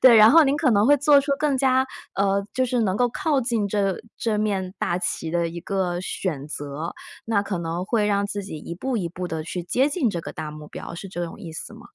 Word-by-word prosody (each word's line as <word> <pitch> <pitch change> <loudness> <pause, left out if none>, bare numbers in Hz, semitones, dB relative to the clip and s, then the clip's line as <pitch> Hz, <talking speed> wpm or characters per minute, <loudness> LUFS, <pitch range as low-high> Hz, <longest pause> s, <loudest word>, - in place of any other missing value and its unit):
对， 255 -2 +8
然 215 0 +9
后 325 +3 +8
您 280 +1 +2
可 295 -4 +3
能 205 -1 +4
会 290 +2 +6
做 285 0 +5
出 280 0 -1
更 285 -2 +1
加， 260 0 +3 0.3
呃， 200 0 +1
就 260 - +2
是 250 -1 0
能 190 -3 +1
够 245 +1 +3
靠 285 +3 0
近 230 -4 0
这 200 -2 0 0.2
这 220 -2 0
面 195 -3 -1
大 175 - 0
旗 170 -2 -2
的 170 0 0
一 170 +1 -6
个 180 -1 -1
选 165 -6 -3
择。 145 +2 -5 0.3
那 220 -3 +1
可 200 -3 -3
能 170 +1 -3
会 210 +1 +1
让 200 -1 +2
自 205 0 -4
己 190 - -6
一 170 +3 -7
步 255 +6 -2
一 180 -6 -1
步 180 +2 -5
地 160 -2 -3
去 175 +3 -4
接 260 +10 +2
近 295 -4 +1
这 175 -5 -2
个 - - -7
大 155 -1 -6
目 150 0 -10
标， - - -8
是 195 +3 -7
这 175 -2 -3
种 165 - -9
意 170 - -7
思 160 - -7
吗？ - - -13
200 Hz, 270 characters per minute, -24 LUFS, 175-250 Hz, 0.3 s, 然